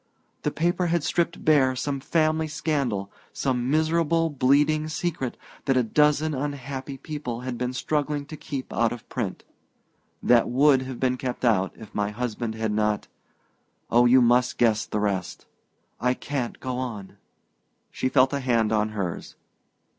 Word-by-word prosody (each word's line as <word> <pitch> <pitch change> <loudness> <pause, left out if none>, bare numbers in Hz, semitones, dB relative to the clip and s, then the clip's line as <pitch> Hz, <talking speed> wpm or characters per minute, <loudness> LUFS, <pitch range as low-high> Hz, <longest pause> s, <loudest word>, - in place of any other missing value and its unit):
"The - - 0
paper 175 +2 0
had 170 -2 +1
stripped 170 +2 -1
bare 135 -4 +4
some 140 +2 -2
family 155 +2 +1
scandal 135 -11 -2 0.2
some 125 -2 -1
miserable 165 +1 +2
bleeding 145 +3 +3
secret 155 -4 -3 0.3
that 135 -1 +2
a 125 - +4
dozen 150 +5 +2
unhappy 140 -1 -4
people 130 -5 -5
had 125 -1 -4
been 125 +1 -2
struggling 145 +2 -1
to 155 - -8
keep 140 -3 -6
out 115 -1 +2
of 120 - -8
print - - -4 0.8
that 120 -1 +4
would 135 +2 +4
have 130 -2 -6
been 130 -1 +1
kept 125 0 -3
out 95 -5 +2
if 110 - -12
my 105 0 0
husband 115 0 -3
had 110 -1 -1
not 105 0 0 0.8
Oh, 120 +1 +5
you 125 +1 +6
must 125 +1 +3
guess 110 -3 +2
the 105 - -2
rest! 95 -4 -2 0.5
I 125 +2 +1
can't 135 -4 -4
go 130 -1 -3
on!" 110 -7 -6 0.7
She 130 - -1
felt 130 +1 +4
a 140 - 0
hand 115 -4 +1
on 110 0 +2
hers. 90 -4 -4
130 Hz, 155 wpm, -25 LUFS, 120-150 Hz, 0.8 s, you